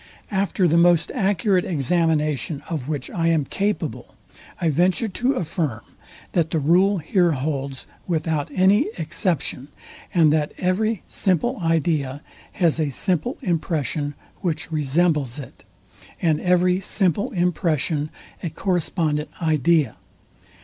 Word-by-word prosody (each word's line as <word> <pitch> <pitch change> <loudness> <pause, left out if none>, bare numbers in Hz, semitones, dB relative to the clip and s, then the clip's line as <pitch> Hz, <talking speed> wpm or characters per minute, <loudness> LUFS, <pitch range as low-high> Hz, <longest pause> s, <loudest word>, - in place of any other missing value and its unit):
After 195 -2 +1
the 165 +1 +4
most 170 -1 +4
accurate 195 -4 +2
examination, 155 -2 0
of 150 -5 -4
which 145 -4 -3
I 165 -2 0
am 160 -4 +2
capable, 205 +8 -3 0.4
I 170 -3 +1
venture 180 - +2
to 245 +7 0
affirm, 155 - -2 0.5
that 165 -3 +1
the 160 - 0
rule 180 +7 +3
here 175 +1 +2
holds 135 -1 -3 0.2
without 160 -3 -1
any 195 +8 +4
exception, 160 - -2 0.4
and 160 -4 +4
that 150 -1 0
every 205 +4 0
simple 200 - 0
idea 155 -4 0 0.3
has 165 -3 +2
a 155 -2 +1
simple 185 - -1
impression, 155 -4 -1 0.2
which 170 -2 -3
resembles 150 -3 +1
it, 140 - -10 0.5
and 160 -3 +1
every 180 0 +3
simple 195 0 0
impression 165 -4 0 0.3
a 170 - -2
correspondent 160 -4 -1
idea. 155 -5 +2
165 Hz, 120 wpm, -23 LUFS, 150-185 Hz, 0.5 s, the